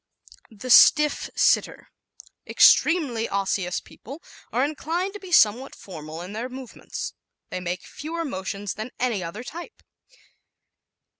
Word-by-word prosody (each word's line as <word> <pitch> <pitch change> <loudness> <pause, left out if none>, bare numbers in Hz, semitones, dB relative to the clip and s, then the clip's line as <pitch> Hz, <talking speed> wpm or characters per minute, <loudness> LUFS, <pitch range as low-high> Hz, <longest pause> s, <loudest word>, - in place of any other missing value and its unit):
The 230 +3 -6
Stiff 300 +3 +6
Sitter - - +1 0.6
¶ - - -21
Extremely 265 -10 +4
Osseous 195 -2 -1
people 280 +8 -12 0.3
are 255 +3 +2
inclined 330 +6 -3
to 410 - -8
be 375 -2 -11
somewhat 245 -2 +4
formal 160 -2 -9
in 185 +3 -8
their 235 +4 -4
movements. 260 -1 -7 0.4
They 185 - -3
make 180 0 -4
fewer 330 +2 -6
motions 200 -4 -4
than 215 +3 -6
any 235 -7 0
other 170 +8 -6
type. 340 +7 -10
240 Hz, 130 wpm, -24 LUFS, 195-300 Hz, 0.6 s, Stiff